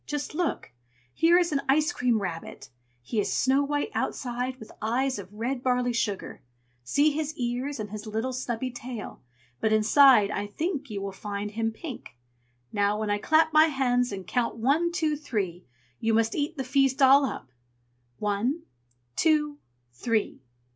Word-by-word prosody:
"Just 295 Hz, -1 st, -3 dB
look! 340 Hz, 0 st, -2 dB, 0.4 s
Here 335 Hz, +2 st, +5 dB
is 350 Hz, -2 st, +2 dB
an 280 Hz, -2 st, +1 dB
ice 305 Hz, +4 st, +3 dB
cream 245 Hz, -6 st, +1 dB
rabbit. 165 Hz, -3 st, -6 dB, 0.3 s
He 215 Hz, -, -2 dB
is 205 Hz, -, 0 dB
snow 270 Hz, +2 st, +2 dB
white 290 Hz, +8 st, -1 dB
outside, 250 Hz, 0 st, -2 dB
with 220 Hz, -, -11 dB
eyes 255 Hz, +3 st, 0 dB
of 190 Hz, -1 st, -10 dB
red 240 Hz, +5 st, -3 dB
barley 250 Hz, -1 st, +1 dB
sugar; 210 Hz, -4 st, -2 dB, 0.4 s
see 285 Hz, -, +3 dB
his 305 Hz, +1 st, -3 dB
ears, 250 Hz, +3 st, -2 dB
and 210 Hz, -2 st, -5 dB
his 215 Hz, +1 st, -7 dB
little 225 Hz, +4 st, -2 dB
snubby 255 Hz, 0 st, -3 dB
tail! 245 Hz, -2 st, -7 dB, 0.4 s
but 220 Hz, -, +1 dB
inside, 215 Hz, 0 st, +6 dB
I 205 Hz, 0 st, -2 dB
think 290 Hz, -, -3 dB
you 200 Hz, -2 st, -4 dB
will 200 Hz, -, -3 dB
find 205 Hz, +1 st, -5 dB
him 225 Hz, +1 st, -1 dB
pink. 235 Hz, -, -9 dB, 0.6 s
Now, 205 Hz, +1 st, +1 dB
when 215 Hz, -1 st, -1 dB
I 205 Hz, -, +1 dB
clap 315 Hz, +5 st, +3 dB
my 310 Hz, +1 st, +7 dB
hands 250 Hz, -5 st, +1 dB
and 190 Hz, -2 st, -6 dB
count 240 Hz, +4 st, -1 dB
one, 290 Hz, +9 st, +2 dB
two, 320 Hz, -4 st, 0 dB
three, 195 Hz, -, -4 dB, 0.3 s
you 225 Hz, 0 st, +1 dB
must 225 Hz, 0 st, +2 dB
eat 300 Hz, +2 st, -2 dB
the 265 Hz, -, -2 dB
feast 270 Hz, 0 st, +2 dB
all 275 Hz, +2 st, +7 dB
up. 190 Hz, -, -4 dB, 0.7 s
One 220 Hz, +10 st, -1 dB, 0.5 s
two 300 Hz, -2 st, +2 dB, 0.3 s
three!" 220 Hz, -, -1 dB
250 Hz, 165 wpm, -27 LUFS, 215-290 Hz, 0.7 s, my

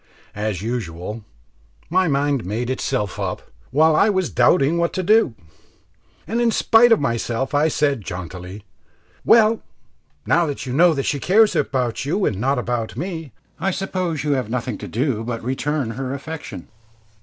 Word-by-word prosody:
As 105 Hz, -3 st, -3 dB
usual, 105 Hz, -2 st, -4 dB, 0.6 s
my 185 Hz, +2 st, +2 dB
mind 140 Hz, -3 st, +1 dB
made 115 Hz, +7 st, -3 dB
itself 130 Hz, -6 st, -2 dB
up -, -, -3 dB, 0.3 s
while 155 Hz, +3 st, +4 dB
I 210 Hz, -, +4 dB
was 190 Hz, -3 st, 0 dB
doubting 165 Hz, 0 st, +3 dB
what 170 Hz, 0 st, 0 dB
to 185 Hz, -, -2 dB
do, 210 Hz, -, +3 dB, 0.9 s
and 230 Hz, +3 st, -1 dB
in 235 Hz, -, +3 dB
spite 230 Hz, +1 st, +4 dB
of 225 Hz, -, +6 dB
myself 120 Hz, 0 st, -2 dB
I 145 Hz, +2 st, +3 dB
said 145 Hz, -5 st, 0 dB
jauntily, 90 Hz, +2 st, -7 dB, 0.6 s
"Well, 225 Hz, -1 st, +5 dB, 0.6 s
now 170 Hz, -1 st, +3 dB
that 140 Hz, -2 st, -4 dB
you 125 Hz, -, -4 dB
know 165 Hz, +3 st, +5 dB
that 135 Hz, -, -2 dB
she 145 Hz, -, 0 dB
cares 205 Hz, +5 st, +4 dB
about 130 Hz, -6 st, -1 dB
you 175 Hz, +8 st, 0 dB
and 100 Hz, 0 st, -1 dB
not 135 Hz, +2 st, +1 dB
about 120 Hz, -2 st, -3 dB
me, 165 Hz, -2 st, -5 dB, 0.3 s
I 190 Hz, +4 st, 0 dB
suppose 185 Hz, -5 st, -2 dB
you 150 Hz, -, 0 dB
have 130 Hz, -6 st, -1 dB
nothing 120 Hz, -2 st, -3 dB
to -, -, -7 dB
do 120 Hz, -1 st, -1 dB
but 115 Hz, 0 st, -4 dB
to -, -, -12 dB
return 135 Hz, -1 st, -1 dB
her 130 Hz, +3 st, -4 dB
affection?" 140 Hz, -, -8 dB
140 Hz, 165 wpm, -21 LUFS, 115-170 Hz, 0.9 s, of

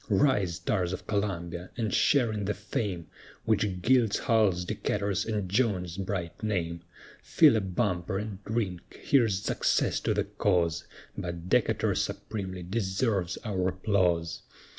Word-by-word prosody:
Rise, 100 Hz, -, +2 dB
tars 90 Hz, +1 st, -1 dB
of -, -, -6 dB
Columbia! 90 Hz, -4 st, -2 dB
and 110 Hz, -3 st, -1 dB
share 125 Hz, -6 st, +3 dB
in 105 Hz, -2 st, -3 dB
the 105 Hz, +1 st, -1 dB
fame, 100 Hz, -4 st, -3 dB, 0.4 s
Which 100 Hz, -4 st, 0 dB
gilds 120 Hz, -3 st, +4 dB
Hull's, 105 Hz, -7 st, +2 dB
Decatur's, 100 Hz, +2 st, -1 dB
and 105 Hz, -4 st, -1 dB
Jones's 95 Hz, -4 st, 0 dB
bright 95 Hz, -3 st, -4 dB
name; 85 Hz, -6 st, -2 dB, 0.4 s
Fill -, -, +5 dB
a 110 Hz, -, +2 dB
bumper, 95 Hz, -1 st, -1 dB
and 105 Hz, -1 st, -5 dB
drink, 100 Hz, -6 st, -3 dB
"Here's 110 Hz, -8 st, +2 dB
success -, -, +1 dB
to -, -, 0 dB
the -, -, +2 dB
cause, 85 Hz, -1 st, 0 dB, 0.3 s
But 85 Hz, 0 st, -5 dB
Decatur -, -, +2 dB
supremely 95 Hz, -4 st, -3 dB
deserves 95 Hz, -1 st, -1 dB
our 95 Hz, -4 st, 0 dB
applause." 90 Hz, -3 st, 0 dB
95 Hz, 135 wpm, -29 LUFS, 90-105 Hz, 0.4 s, Fill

